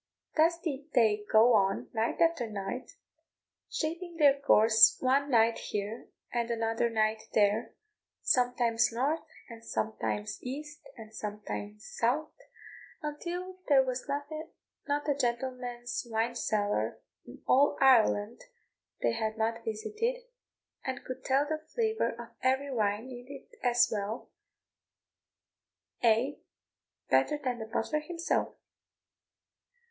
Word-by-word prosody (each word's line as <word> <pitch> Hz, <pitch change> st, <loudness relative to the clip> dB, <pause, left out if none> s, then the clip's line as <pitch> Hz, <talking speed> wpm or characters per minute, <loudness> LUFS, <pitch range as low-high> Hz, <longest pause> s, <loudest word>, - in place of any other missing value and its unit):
Thus 330 Hz, +2 st, +4 dB
did 295 Hz, -3 st, -5 dB
they 215 Hz, -4 st, +3 dB
go 225 Hz, +3 st, +6 dB
on, 195 Hz, -2 st, +2 dB
night 225 Hz, 0 st, -1 dB
after 330 Hz, -9 st, +2 dB
night, 205 Hz, +5 st, -5 dB, 0.7 s
shaping 340 Hz, +2 st, -3 dB
their 285 Hz, -3 st, +5 dB
course 225 Hz, -5 st, +6 dB
one 275 Hz, +2 st, +2 dB
night 230 Hz, -2 st, +4 dB
here, 210 Hz, +2 st, -4 dB, 0.3 s
and 235 Hz, -1 st, 0 dB
another 225 Hz, 0 st, 0 dB
night 220 Hz, -1 st, +1 dB
there; 210 Hz, +2 st, +2 dB, 0.5 s
sometimes 245 Hz, -2 st, +2 dB
north, 275 Hz, +8 st, 0 dB, 0.3 s
and 230 Hz, -1 st, -11 dB
sometimes 110 Hz, -, -3 dB
east, 295 Hz, +3 st, -7 dB, 0.2 s
and 220 Hz, -1 st, -11 dB
sometimes 210 Hz, 0 st, -6 dB
south, 285 Hz, +7 st, 0 dB, 0.7 s
until 355 Hz, +5 st, -5 dB
there 275 Hz, -3 st, +6 dB
was 255 Hz, +1 st, -4 dB, 0.8 s
not 290 Hz, +1 st, -1 dB
a 290 Hz, -, +3 dB
gentleman's 245 Hz, -2 st, -3 dB
wine 225 Hz, +2 st, 0 dB
cellar 205 Hz, -, -1 dB, 0.3 s
in 120 Hz, -, -13 dB
all 280 Hz, +3 st, +4 dB
Ireland 230 Hz, -4 st, +4 dB, 0.6 s
they -, -, +3 dB
had 220 Hz, -1 st, -2 dB
not 225 Hz, +1 st, -1 dB
visited, 425 Hz, -, -2 dB, 0.7 s
and 260 Hz, -2 st, -4 dB
could 255 Hz, 0 st, -6 dB
tell 275 Hz, +2 st, +2 dB
the 310 Hz, +1 st, -2 dB, 0.2 s
flavour 440 Hz, -, 0 dB
of 235 Hz, -1 st, -8 dB
every 265 Hz, +2 st, +1 dB
wine 210 Hz, 0 st, 0 dB
in 245 Hz, 0 st, -9 dB
it 280 Hz, -1 st, -11 dB
as 240 Hz, -1 st, +4 dB
well, 210 Hz, +2 st, -4 dB, 1.7 s
ay, 235 Hz, +5 st, +2 dB, 0.7 s
better 300 Hz, -, +3 dB
than 255 Hz, -4 st, -3 dB
the 220 Hz, -, -6 dB
butler 240 Hz, +6 st, -1 dB
himself. 335 Hz, +2 st, -2 dB
240 Hz, 120 wpm, -30 LUFS, 220-285 Hz, 1.7 s, go